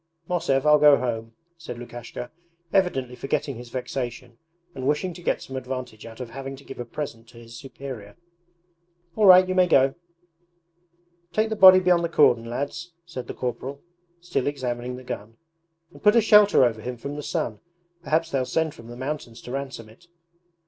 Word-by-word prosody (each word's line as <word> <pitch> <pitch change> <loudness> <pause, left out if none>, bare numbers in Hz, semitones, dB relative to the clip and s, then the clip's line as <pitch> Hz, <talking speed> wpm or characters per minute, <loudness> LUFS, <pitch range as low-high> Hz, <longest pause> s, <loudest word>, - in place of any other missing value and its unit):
'Mosev, 140 -6 0
I'll 150 0 +6
go 145 -1 +7
home,' 115 -2 -3 0.3
said 160 -7 -7
Lukashka, 120 0 -8 0.4
evidently 135 -11 +1
forgetting 140 -1 -2
his 120 0 -10
vexation 125 -1 -5 0.3
and 130 -3 -4
wishing 160 +5 0
to 175 - -11
get - - -1
some 135 - -9
advantage 125 -4 -6
out 115 +1 -12
of 125 -2 -7
having 135 +2 -6
to 135 - -15
give 135 - -10
a 120 - -4
present 115 -3 -6
to 120 - -17
his 115 0 -12
superior. 130 -4 -9 1.0
'All 210 -2 +4
right, 185 0 +9
you 185 - -1
may 185 -1 +4
go!' 135 -4 +4 1.4
'Take 215 +3 +1
the 220 - -2
body 190 -2 +9
beyond 180 -2 +3
the 170 - -1
cordon, 125 -8 +4
lads,' 145 +8 -5
said 130 -8 -7
the - - -6
corporal, 130 +3 -4 0.4
still 170 -6 -2
examining 125 -3 -3
the 130 - -10
gun, 115 -2 -7 0.6
'and - - -15
put 210 +2 +5
a 235 - +6
shelter 210 - +6
over 110 -2 -1
him 125 +2 -5
from 140 +5 -6
the 150 - -5
sun. 110 -6 -3 0.4
Perhaps 165 -1 0
they'll 135 -2 +1
send 160 +3 -1
from 115 - -13
the 120 0 -9
mountains 130 -3 -5
to 125 - -8
ransom 135 -4 -5
it.' 115 +11 -19
135 Hz, 185 wpm, -25 LUFS, 120-160 Hz, 1.4 s, right